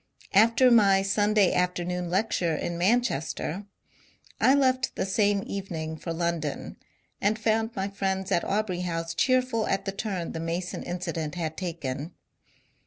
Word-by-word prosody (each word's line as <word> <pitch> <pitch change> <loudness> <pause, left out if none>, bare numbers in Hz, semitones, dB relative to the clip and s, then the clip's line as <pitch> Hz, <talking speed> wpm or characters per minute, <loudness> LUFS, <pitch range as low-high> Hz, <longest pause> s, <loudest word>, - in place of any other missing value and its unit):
After 230 +5 +5
my 200 -4 +5
Sunday 205 0 +3
afternoon 180 0 -1
lecture 180 -3 +1
in 170 +3 -3
Manchester, 190 - 0 0.7
I 265 - +5
left 260 -2 +2
the - - -1
same 200 0 +2
evening 165 -5 -4
for 165 +2 -6
London, 165 -3 -3 0.4
and 210 +2 +2
found 225 +1 0
my 195 -1 -1
friends 190 -1 -2
at 170 - +2
Aubrey 200 -3 -1
House 165 -2 -3
cheerful 255 +2 +1
at 195 - -1
the 195 - -1
turn 195 -4 -3
the 165 - -5
Mason 170 +2 -3
incident 175 -3 -4
had 160 -3 -3
taken. 160 -4 -4
190 Hz, 140 wpm, -27 LUFS, 170-215 Hz, 0.7 s, After